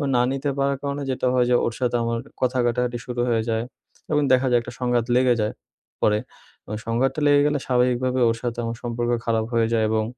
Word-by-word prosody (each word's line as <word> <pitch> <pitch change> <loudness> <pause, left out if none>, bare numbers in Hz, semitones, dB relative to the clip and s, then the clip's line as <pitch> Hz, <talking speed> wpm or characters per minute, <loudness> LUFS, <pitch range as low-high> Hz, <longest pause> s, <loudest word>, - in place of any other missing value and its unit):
না 120 - +4
নিতে 140 +1 -2
পারার 140 0 +1
কারণে 140 0 -3
যেটা 130 0 -1
হয় 125 -1 +3
যে - - +5
ওর 115 - -1
সাথে 125 -1 0
আমার 115 0 -1 0.2
কথা 130 0 +1
কাটাকাটি 120 0 0
শুরু 120 -1 -3
হয়ে 115 -1 +1
যায়। 110 0 0 0.5
এবং 150 0 +3
দেখা 130 +1 +3
যায় 120 - +5
একটা 120 - -9
সংঘাত 120 -2 +1
লেগে 125 -1 +4
যায়, 105 0 -1 0.5
পরে। 105 0 +3 0.7
সংঘাতটা 130 +5 0
লেগে 145 0 +5
গেলে 150 -1 0
স্বাভাবিকভাবে 125 0 +1
ওর 115 - +1
সাথে 120 -1 -3
আমার 115 0 -3
সম্পর্ক 120 0 -2
খারাপ 115 -1 +1
হয়ে 115 -1 +3
যায় 110 -1 +2
এবং, 110 0 +1
120 Hz, 205 wpm, -23 LUFS, 115-130 Hz, 0.7 s, যে